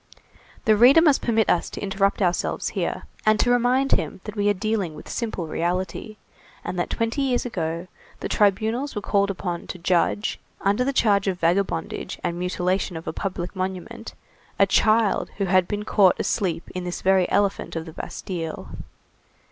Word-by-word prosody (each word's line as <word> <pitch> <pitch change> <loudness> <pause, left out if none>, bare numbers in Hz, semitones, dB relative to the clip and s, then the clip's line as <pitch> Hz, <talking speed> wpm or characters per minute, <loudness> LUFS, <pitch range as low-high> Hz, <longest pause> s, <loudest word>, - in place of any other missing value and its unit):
The 215 - +5
reader 245 +8 +7
must 305 -4 +4
permit 225 -2 +2
us 175 - +1
to - - -7
interrupt 195 0 0
ourselves 175 -1 0
here - - -3 0.2
and 215 0 +3
to 245 - +3
remind 250 +3 +2
him - - 0
that 210 - -7
we 205 -1 +2
are - - +4
dealing 200 -5 -1
with - - -11
simple 220 -7 -3
reality, 180 +6 -3 0.5
and 180 - -4
that 175 - -1
twenty 230 +4 -1
years 255 -3 +1
ago, 165 -7 -3 0.3
the - - -3
tribunals 220 +7 +1
were 210 - -2
called 200 0 +2
upon 180 -3 -4
to - - -6
judge, 180 +4 0 0.2
under 200 +5 +2
the 275 - 0
charge 205 -6 +2
of 185 -2 -1
vagabondage, 170 -1 -1
and 175 -1 -2
mutilation 180 0 -1
of 160 - -9
a - - -2
public 185 -1 -4
monument, 190 +5 -5 0.4
a 200 - +6
child 215 +2 +2
who 200 - 0
had 185 -1 +3
been 210 0 -3
caught 195 -5 +4
asleep 175 -5 -1
in 180 - -4
this 180 0 -5
very 190 -1 +3
elephant 200 -3 0
of 160 -1 -3
the 160 - -10
Bastille. 165 -2 -6
195 Hz, 175 wpm, -24 LUFS, 180-220 Hz, 0.5 s, reader